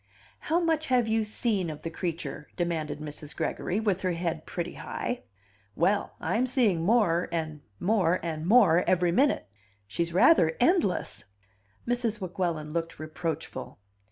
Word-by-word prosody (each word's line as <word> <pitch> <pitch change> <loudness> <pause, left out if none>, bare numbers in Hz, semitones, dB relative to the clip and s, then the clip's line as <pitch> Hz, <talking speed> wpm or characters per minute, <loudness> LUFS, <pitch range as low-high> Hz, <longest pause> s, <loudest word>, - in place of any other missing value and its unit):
"How 330 +2 +1
much 320 -2 +1
have 250 -3 +3
you 220 0 +2
seen 210 -4 -1
of 150 -1 -8
the 165 - -4
creature?" 165 -3 -4
demanded 160 -4 -2
Mrs. 150 0 -7
Gregory, 190 - -1
with 205 -4 0
her 185 -1 0
head 165 -2 -3
pretty 175 0 -4
high. 245 - -4 0.5
"Well, 200 +5 +1
I'm 245 +3 0
seeing 230 - +2
more, 180 -3 +2
and 155 -3 -3 0.2
more, 185 -3 +2
and 160 -1 -3
more 190 -6 +6
every 180 -1 +3
minute. 275 +11 +2 0.4
She's 165 +12 -2
rather 170 - +5
endless." 325 - +1 0.6
Mrs. 235 -3 0
Weguelin 175 -5 -3
looked 165 -1 -3
reproachful. 155 -3 -5
175 Hz, 140 wpm, -28 LUFS, 165-220 Hz, 0.6 s, more